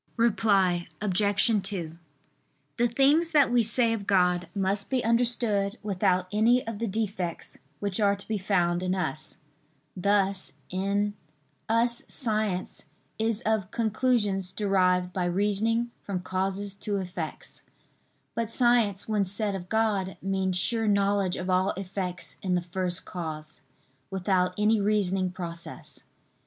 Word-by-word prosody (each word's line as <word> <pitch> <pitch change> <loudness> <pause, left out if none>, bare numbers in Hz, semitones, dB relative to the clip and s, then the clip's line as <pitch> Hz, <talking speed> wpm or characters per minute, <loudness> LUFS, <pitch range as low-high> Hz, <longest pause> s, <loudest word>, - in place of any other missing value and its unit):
Reply 200 -6 +2
Obj. 205 +2 +2
2: 185 -5 -2 0.8
The 240 - +3
things 280 +7 +3
that 285 -5 +5
we 245 -1 +4
say 230 +1 +5
of 205 -3 -5
God 180 -2 +3
must 200 +1 -1
be 260 -2 0
understood 230 -3 +1
without 185 -2 +1
any 230 +4 +3
of 225 -2 -5
the 230 - -1
defects 200 -4 -3 0.2
which 200 0 -2
are 200 -1 +3
to 200 - -9
be 215 -2 -1
found 175 -3 +1
in 185 0 0
us: 155 -4 -3 0.6
thus 195 0 +1 0.2
in 200 +2 0 0.6
us 235 +1 +2
science 215 - -1 0.3
is 225 0 0
of 215 -4 0
conclusions 215 -5 0
derived 185 -3 +1
by 180 -1 -1
reasoning 210 +6 0
from 190 -3 -4
causes 190 +2 -2
to 205 -1 -2
effects: 180 -4 -5 0.7
but 230 -2 -2
science 230 -5 +2
when 210 -2 +1
said 205 +2 -2
of 180 -2 -6
God 210 -4 0
means 190 -1 -1
sure 225 +4 0
knowledge 200 -2 +2
of 180 - -5
all 185 +1 +2
effects 185 -3 -5
in 185 -2 0
the 175 - 0
First 180 0 -3
Cause, 155 -3 -6 0.5
without 185 -1 0
any 210 +1 +3
reasoning 195 -3 +1
process. 170 -2 -7
200 Hz, 135 wpm, -27 LUFS, 185-220 Hz, 0.8 s, that